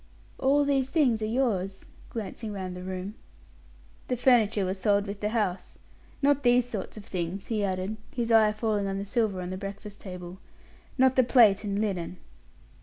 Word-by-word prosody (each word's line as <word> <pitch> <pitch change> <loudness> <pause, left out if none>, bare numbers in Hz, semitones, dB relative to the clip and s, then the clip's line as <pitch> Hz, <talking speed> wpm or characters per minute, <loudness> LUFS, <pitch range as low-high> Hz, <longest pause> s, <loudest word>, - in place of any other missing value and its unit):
All 285 +2 +3
these 270 -2 +1
things 270 -7 +2
are 215 - -1
yours?" 210 -6 -1 0.2
glancing 220 0 -5
round 185 -3 -5
the 180 - -7
room. 185 +2 -5 0.9
"The 250 - 0
furniture 225 -5 +3
was 190 +1 -3
sold 200 0 +2
with 200 0 -6
the 210 - -1
house. 210 -5 -2 0.5
Not 285 0 +4
these 245 -1 +4
sort 215 -3 -5
of 205 - -9
things," 180 +1 -4
he 215 -3 -1
added, 190 +2 -2
his 235 -2 -2
eye 220 -1 +6
falling 215 -2 -1
on 195 0 -2
the 200 - -4
silver 210 -3 0
on 180 0 -5
the 185 - -4
breakfast 200 +1 -8
table; 180 -1 -8 0.6
"not 260 0 +4
the 255 - +5
plate 230 -5 +5
and 200 -1 -2
linen." 185 -4 -2
210 Hz, 180 wpm, -28 LUFS, 190-235 Hz, 0.9 s, eye